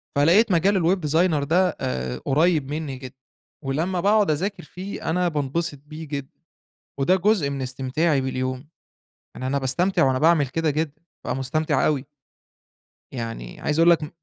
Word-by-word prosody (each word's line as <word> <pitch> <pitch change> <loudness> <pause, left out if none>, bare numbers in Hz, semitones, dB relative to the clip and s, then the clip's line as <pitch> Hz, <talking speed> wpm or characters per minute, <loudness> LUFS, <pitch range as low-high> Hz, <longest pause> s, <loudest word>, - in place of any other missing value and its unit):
فلقيت 175 +10 +4
مجال 185 +4 +3
الweb 170 -1 +1
designer 160 -2 +2
ده 180 +6 +3
آآ 65 0 -2
قريب 155 0 +2
منّي 150 -3 -3
جدًا، 130 0 -10 0.5
ولمّا 165 +7 -1
باقعد 205 -2 +3
أذاكر 190 +7 -2
فيه 185 +4 -6
أنا 180 +2 +1
بانبسط 150 0 -2
بيه 155 +1 -9
جدًا، 140 -2 -6 0.6
وده 160 +7 +3
جزء 190 -6 +2
من 135 -1 -4
استمتاعي 135 +4 0
باليوم، 130 +1 -3 0.7
يعني 130 - -4
أنا 140 - 0
باستمتع 140 +9 +1
وأنا 130 -1 +2
باعمل 160 -2 +4
كده 165 +4 -1
جدًا، 150 0 -2 0.2
بابقى - - -2
مُستمتع 150 +2 0
أوي. 145 -3 0 1.1
يعني 115 - -6
عايز 150 +1 0
أقول 165 +1 +6
لك 170 -2 +4
م 150 - -5
150 Hz, 155 wpm, -23 LUFS, 135-170 Hz, 1.1 s, أقول